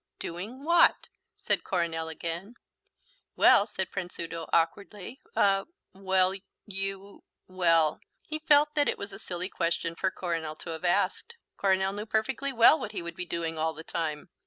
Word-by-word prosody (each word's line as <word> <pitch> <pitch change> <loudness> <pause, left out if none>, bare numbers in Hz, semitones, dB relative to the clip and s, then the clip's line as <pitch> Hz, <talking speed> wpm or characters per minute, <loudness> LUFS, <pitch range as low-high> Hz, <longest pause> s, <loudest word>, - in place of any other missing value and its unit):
"Doing 205 +11 -7
what?" 340 +2 +4 0.3
said - - 0
Coronel 165 -3 -1
again. 170 +7 -6 0.8
"Well," 205 - +6
said 190 -3 -4
Prince 180 -1 -5
Udo 165 -1 -5
awkwardly, 200 +7 -1 0.2
"er 195 -1 +3 0.3
well, 190 -1 +2 0.3
you 195 0 -6 0.2
well." 165 -4 +3 0.2
He 310 0 -5
felt 295 -1 +4
that 290 -2 +2
it - - -1
was 200 0 -7
a - - -9
silly 180 0 -4
question 170 -2 -1
for 190 +3 0
Coronel 165 -4 -3
to 165 - -8
have 160 +2 -6
asked. 325 - 0 0.2
Coronel 190 0 +1
knew 210 +2 -5
perfectly 255 +6 -1
well 245 +5 +6
what 215 -4 -6
he 180 - -4
would 170 0 -7
be 180 0 -4
doing 165 -2 -3
all 160 0 0
the 160 - -8
time. 160 +1 -4
185 Hz, 160 wpm, -28 LUFS, 165-210 Hz, 0.8 s, Well